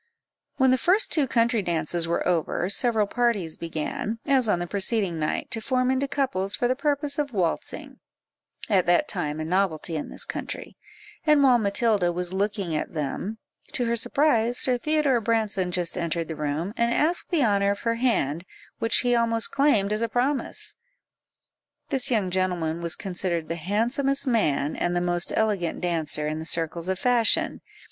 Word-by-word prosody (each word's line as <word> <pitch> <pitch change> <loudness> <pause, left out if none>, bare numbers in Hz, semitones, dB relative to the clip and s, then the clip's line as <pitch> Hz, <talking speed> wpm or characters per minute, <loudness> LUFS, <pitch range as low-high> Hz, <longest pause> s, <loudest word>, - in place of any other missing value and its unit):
When 265 -1 +4
the 255 - +3
first 385 - +2
two 295 -4 +3
country 230 -2 +2
dances 170 -1 -1
were 170 - -1
over, 175 +1 0
several 225 -1 +2
parties 205 -7 0
began, 165 +7 -4
as 265 -5 +3
on 195 - +3
the 175 - -3
preceding 195 -2 0
night, 155 - -2
to 225 - -1
form 255 +1 +1
into 265 +1 0
couples 200 -9 -1
for 245 - 0
the 255 - +1
purpose 285 +1 0
of 285 -3 -2
waltzing, 180 -5 -3 0.7
at 190 -5 +2
that 175 0 +3
time 150 +1 -3
a 155 - -3
novelty 170 -2 -1
in 150 - -4
this - - -2
country; - - -6 0.5
and 300 -2 +4
while 255 -3 +5
Matilda 200 -3 +1
was 180 +1 -2
looking 195 -3 -1
at 150 - -3
them, 165 +8 -3 0.4
to 245 - 0
her 235 0 +1
surprise, 240 -1 +2
Sir 255 - +3
Theodore 300 -4 +1
Branson 215 -4 0
just 180 -2 -1
entered 170 -1 -2
the 160 - -4
room, 155 +6 -3
and 235 0 +1
asked 325 +7 +1
the 315 -8 +2
honour 200 -2 +2
of 200 - -2
her 230 - 0
hand, 170 - +1 0.4
which 225 0 +2
he 245 -1 +1
almost 230 -1 +1
claimed 220 -8 +2
as 215 - -2
a 230 - 0
promise. 260 +4 -1 1.1
This 265 -3 +1
young 210 -7 +1
gentleman 175 -3 -1
was 170 -1 0
considered 180 -4 -3
the 165 - -1
handsomest 240 - +1
man, 155 - +1
and 175 0 -1
the - - +2
most 175 -1 0
elegant 205 -6 0
dancer, 160 -4 0
in 155 +1 -3
the 160 - -6
circles 165 +1 -1
of 190 - 0
fashion. 240 +1 +2
205 Hz, 175 wpm, -25 LUFS, 175-245 Hz, 1.1 s, while